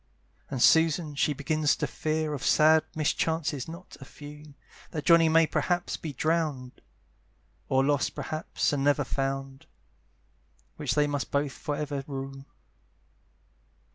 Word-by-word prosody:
And 130 -3 0
Susan 160 +3 +4
she 145 +1 +1
begins 150 +1 +1
to - - -2
fear 155 0 -2
Of 140 - -5
sad 155 +1 +5
mischances 155 -2 -1
not 170 +3 -10
a - - -8
few, 150 +1 -12 0.3
That 150 -4 -5
Johnny 165 -1 +6
may 165 +1 +5
perhaps 175 +2 -1
be 160 - -6
drown'd, 150 -3 -2 0.9
Or 135 0 +3
lost 145 -1 +1
perhaps, 155 0 -2
and 140 -1 0
never 145 0 +3
found; 135 0 -4 1.1
Which - - -1
they 150 -1 +4
must 145 -1 -2
both 140 -1 0
for 145 +1 -4
ever 145 -2 -3
rue. 135 -1 -6
150 Hz, 135 wpm, -28 LUFS, 135-160 Hz, 1.1 s, Johnny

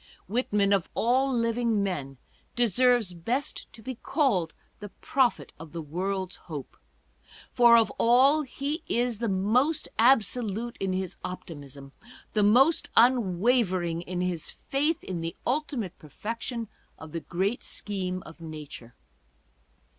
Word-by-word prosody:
Whitman, 205 -2 +1
of 195 -4 +1
all 260 +4 +2
living 230 -3 +1
men, 140 -9 -3 0.4
deserves 240 -2 +3
best 235 +12 -3
to 225 - -14
be 260 - -4
called 225 - 0 0.2
the 205 -1 -8
prophet 260 +4 0
of 160 0 -11
the 170 - -4
world's 185 +4 -3
hope; 150 -5 -8 0.8
for 235 -1 +7
of 225 - +3
all 265 +6 +5
he 285 +3 -4
is 240 -2 0
the 230 -2 -1
most 230 +11 +1
absolute 235 -1 +2
in 195 -1 -1
his 185 0 -3
optimism, 145 -6 -8 0.4
the 215 - +2
most 250 +10 +4
unwavering 195 -6 +3
in 180 +1 -4
his 180 -3 -2
faith 295 +3 -1
in 180 -3 -4
the 165 0 -4
ultimate 255 - -1
perfection 230 - -5 0.3
of 160 -1 -10
the 165 - -3
great 190 +9 -2
scheme 185 -3 -3
of 165 - -12
nature. 150 -7 -9
210 Hz, 130 wpm, -27 LUFS, 180-245 Hz, 0.8 s, for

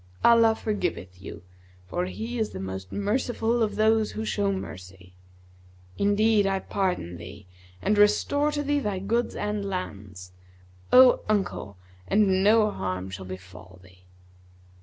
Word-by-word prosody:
Allah 230 -1 +6
forgiveth 175 - -4
you; 100 0 -9 0.4
for 175 - -2
He 230 +5 -5
is 220 - 0
the - - -8
most 95 0 -6
merciful 230 +2 -1
of 215 -2 0
those 220 0 +2
who 220 - -4
show 205 -2 0
mercy.[FN#163] 90 - -8 0.9
Indeed 205 0 +3
I 195 0 +1
pardon 180 - -2
thee, 95 +4 -11 0.4
and 205 +1 +2
restore 285 +8 +3
to 290 0 -1
thee 290 0 +1
thy 205 -8 -2
goods 225 +6 -1
and 210 0 -2
lands, 100 - -6 0.6
O 255 0 +7
uncle, 195 - -1 0.3
and 195 -2 +3
no 215 0 +4
harm 95 - -4
shall 95 0 -7
befall 95 0 -11
thee.' 90 -1 -20
195 Hz, 140 wpm, -26 LUFS, -, 0.9 s, O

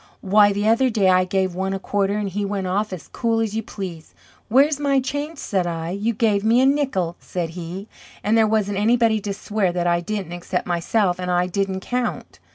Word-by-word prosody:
Why, 205 +1 +5
the 205 +1 -1
other 230 +4 +4
day, 205 -5 +2
I 185 0 +4
gave 190 0 0
one 190 +2 -2
a 195 - -3
quarter 200 +1 0
and 210 -1 -2
he 200 +2 -3
went 200 -1 -2
off 200 +3 -1
as 185 -4 -7
cool 230 -2 -1
as 220 -2 -1
you 225 - 0
please. 185 -7 -8 0.3
'Where's 280 +5 +4
my 280 -2 +2
change?' 290 +4 -4
said 190 -9 -1
I. 165 0 -3
'You 205 +5 -1
gave 210 -2 +1
me 225 +3 +4
a 260 - +4
nickel,' 265 - 0
said 175 -2 -4
he. 180 +4 -7 0.4
And 210 +2 +2
there 220 -1 +4
wasn't 205 -2 0
anybody 225 0 +3
to 200 - -3
swear 200 -1 -1
that 175 -1 -1
I 170 0 +2
didn't 195 -2 -4
except 175 +1 -3
myself, 180 +2 0
and 180 0 -3
I 180 0 +2
didn't 190 +1 -2
count." 245 +3 -3
200 Hz, 215 wpm, -22 LUFS, 185-225 Hz, 0.4 s, Why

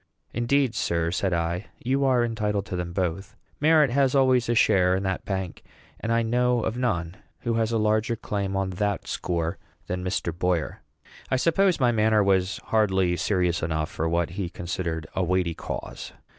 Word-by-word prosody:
"Indeed, 125 +1 +1
sir," 85 -5 0
said 95 +1 0
I, 85 +3 -1
"you 135 +3 0
are 125 -3 +3
entitled 105 -3 -1
to 95 - -5
them 90 -1 -3
both. 90 +1 -3 0.2
Merit 150 -3 +4
has 135 +1 +2
always 130 -3 +3
a 120 - +2
share 90 -4 +4
in 95 - -2
that 95 -1 -2
bank; 95 -4 -4 0.4
and 115 - -3
I 115 0 +2
know 125 +1 +2
of 110 - -1
none 90 -8 -1 0.2
who 120 - -1
has 115 0 +1
a 115 - +1
larger 110 +2 +1
claim 100 -3 -3
on 95 -1 -1
that 100 +2 -2
score 85 -2 -2 0.3
than 90 0 -3
Mr. 90 -3 -2
Boyer." 90 -3 -1 0.5
I - - +2
suppose 170 +6 +2
my 125 -2 +4
manner 110 -2 +3
was 95 -1 +2
hardly 95 -5 +2
serious 90 -1 0
enough 80 -1 -2
for 80 +1 -2
what 85 0 0
he 90 -1 -3
considered 85 -2 -4
a 95 - +1
weighty 90 -1 +1
cause. - - -7
100 Hz, 180 wpm, -25 LUFS, 90-115 Hz, 0.5 s, Merit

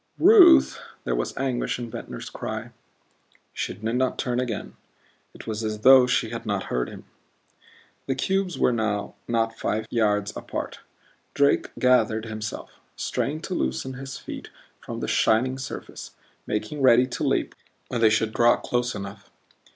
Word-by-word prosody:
"Ruth!" 350 -6 +7 0.2
There 65 - -1
was - - -2
anguish 130 -3 -1
in 120 -2 -6
Ventnor's - - -7
cry. - - -5 0.8
She - - -3
did - - -18
not 130 0 0
turn 125 -1 -1
again. 120 -4 -4 0.6
It - - -11
was 110 0 -4
as 110 -1 -3
though 130 +1 +8
she 115 -2 0
had 115 - -5
not 100 -3 -2
heard 60 0 0
him. - - -11 1.0
The 135 - 0
cubes 190 +5 -1
were 125 - +3
now 110 -3 -1
not 115 -1 0
five 110 +1 -1
yards 105 -3 +1
apart. - - -5 0.6
Drake 140 0 +3
gathered 125 -3 +3
himself; 110 -1 -6 0.2
strained 155 +4 -2
to 185 - -4
loosen 65 - -2
his 135 +1 -7
feet - - -8 0.3
from - - -7
the - - -2
shining 130 +4 +2
surface, 130 - -8 0.3
making 140 +8 -3
ready 125 -1 +6
to 125 - -5
leap - - 0 0.4
when 120 - -2
they 110 - +6
should 110 0 +1
draw 120 0 +5
close 120 0 -2
enough. 100 0 -8
120 Hz, 155 wpm, -25 LUFS, 110-130 Hz, 1.0 s, though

